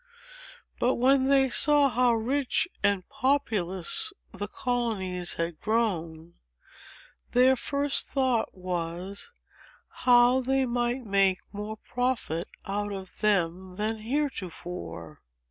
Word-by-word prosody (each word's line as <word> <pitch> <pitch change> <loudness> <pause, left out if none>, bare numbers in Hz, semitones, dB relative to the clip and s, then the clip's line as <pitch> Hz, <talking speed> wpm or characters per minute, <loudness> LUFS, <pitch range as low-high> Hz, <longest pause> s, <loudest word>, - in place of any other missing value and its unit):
But, 250 +2 +2
when 260 +2 +3
they 270 0 +4
saw 290 +2 +5
how 245 -1 +2
rich 270 +7 0
and 200 -3 +1
populous 260 - +1 0.2
the 205 +2 -5
colonies 210 -8 -1
had 165 -1 -4
grown, 170 -7 -2 1.0
their 255 +2 +5
first 280 +2 +1
thought 255 -7 0
was, 180 - -5 0.6
how 245 +1 +4
they 265 +1 +1
might 240 +1 -1
make 195 -2 +3 0.2
more 210 +2 -6
profit 240 -9 -2 0.2
out 205 +1 -3
of 190 -2 -7
them 185 -3 0
than 215 +2 -2
heretofore. 180 - -5
220 Hz, 105 wpm, -27 LUFS, 185-260 Hz, 1.0 s, saw